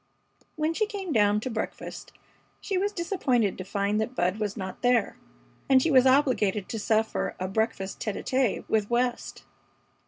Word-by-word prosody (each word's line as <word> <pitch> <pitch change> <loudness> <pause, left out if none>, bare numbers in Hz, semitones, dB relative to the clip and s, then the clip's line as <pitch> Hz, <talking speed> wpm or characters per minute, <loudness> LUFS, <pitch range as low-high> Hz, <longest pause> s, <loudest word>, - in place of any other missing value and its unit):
When 310 +1 0
she 430 +5 0
came 390 -6 -4
down 210 -2 +3
to 255 - -3
breakfast 220 -1 -5 0.5
she 395 - -3
was 400 +2 +1
disappointed 280 - 0
to - - -3
find 200 +2 -1
that 245 +4 -4
Bud 180 +2 0
was 210 0 -2
not 190 -2 -6
there, 245 -3 +2 0.5
and 265 -1 +7
she 320 +5 +1
was 260 -1 +6
obliged 250 -8 +2
to 225 - -3
suffer 220 +1 0
a 185 - -2
breakfast 195 -1 -2
tête 215 - -3
à - - -6
tête 260 -4 0
with 215 -2 0
West. 240 0 -1
225 Hz, 175 wpm, -27 LUFS, 205-270 Hz, 0.5 s, and